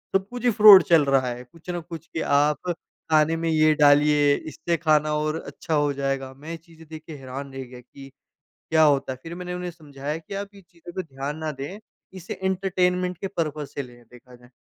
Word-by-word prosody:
सब-कुछ 240 Hz, +6 st, -2 dB
ही 240 Hz, -, +5 dB
fraud 210 Hz, -3 st, +9 dB
चल 160 Hz, -4 st, +4 dB
रहा 135 Hz, -2 st, +2 dB
है, 125 Hz, 0 st, -5 dB
कुछ 165 Hz, +7 st, -17 dB
न 175 Hz, -1 st, -4 dB
कुछ 165 Hz, -1 st, -8 dB
कि 160 Hz, -, -4 dB, 0.2 s
आप 150 Hz, +4 st, 0 dB, 0.4 s
खाने 155 Hz, +1 st, +4 dB
में 165 Hz, 0 st, -1 dB
ये 155 Hz, -1 st, +4 dB
डालिए 145 Hz, 0 st, +5 dB
इससे 165 Hz, +2 st, -2 dB
खाना 155 Hz, -2 st, +2 dB
और 155 Hz, +1 st, -1 dB
अच्छा 165 Hz, -, -5 dB
हो 145 Hz, -1 st, +1 dB
जाएगा। 135 Hz, -1 st, -3 dB
मैं 150 Hz, +5 st, -10 dB
ये 165 Hz, -, -5 dB
चीज़ें 165 Hz, -1 st, -18 dB
देख 155 Hz, -1 st, -8 dB
के 160 Hz, -, -7 dB
हैरान 135 Hz, +1 st, -8 dB
रह 135 Hz, 0 st, -5 dB
गया 125 Hz, -1 st, -11 dB
कि 135 Hz, +2 st, -14 dB, 0.6 s
क्या 160 Hz, 0 st, +4 dB
होता 140 Hz, -3 st, +2 dB
है, 130 Hz, -, -9 dB
फिर 165 Hz, +1 st, -7 dB
मैंने 180 Hz, 0 st, -6 dB
उन्हें 180 Hz, 0 st, -4 dB
समझाया 150 Hz, -2 st, -6 dB
कि 165 Hz, +5 st, -10 dB
आप 200 Hz, 0 st, -4 dB
ये 200 Hz, -, -14 dB
चीज़ों 175 Hz, -1 st, -14 dB
पे 185 Hz, -, -2 dB
ध्यान 140 Hz, -1 st, -6 dB
ना 155 Hz, -1 st, -3 dB
दें, 145 Hz, +9 st, -7 dB, 0.4 s
इसे 185 Hz, -1 st, -7 dB
एंटरटेनमेंट 180 Hz, -1 st, 0 dB
के 195 Hz, -, -4 dB
पर्पज 155 Hz, -5 st, -3 dB
से 140 Hz, -, -3 dB
लें 120 Hz, -1 st, -14 dB
देखा 125 Hz, +1 st, -16 dB
जाए 120 Hz, 0 st, -20 dB
155 Hz, 220 wpm, -24 LUFS, 140-175 Hz, 0.6 s, fraud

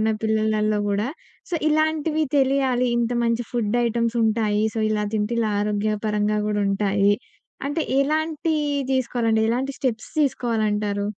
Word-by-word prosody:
ఉన్న 220 Hz, 0 st, +2 dB
పిల్లలలో 215 Hz, -1 st, +1 dB
గూడా. 205 Hz, +4 st, 0 dB, 0.4 s
సో, 350 Hz, -, -1 dB
ఇలాంటివి 310 Hz, 0 st, +1 dB
తెలియాలి, 265 Hz, -2 st, +2 dB
ఇంత 240 Hz, 0 st, 0 dB
మంచి 230 Hz, +1 st, 0 dB
ఫుడ్ 235 Hz, -1 st, 0 dB
ఐటెమ్సుంటాయి 225 Hz, -2 st, +1 dB
సో, 220 Hz, -, -1 dB
ఇలా 210 Hz, -1 st, 0 dB
తింటే 215 Hz, +2 st, 0 dB
ఇలా 220 Hz, -2 st, +1 dB
ఆరోగ్యపరంగా 210 Hz, 0 st, 0 dB
గూడుంటాయి, 200 Hz, -1 st, +2 dB, 0.5 s
అంటే 300 Hz, +3 st, -1 dB, 0.2 s
ఎలాంటి 310 Hz, +2 st, 0 dB, 0.4 s
దీసుకోలంటే 235 Hz, -3 st, +1 dB
ఎలాంటి 260 Hz, +4 st, -1 dB
స్టెప్స్ 240 Hz, -4 st, -2 dB
తీసుకోవాలంటారు? 210 Hz, -6 st, 0 dB
225 Hz, 120 wpm, -23 LUFS, 210-260 Hz, 0.5 s, ఉన్న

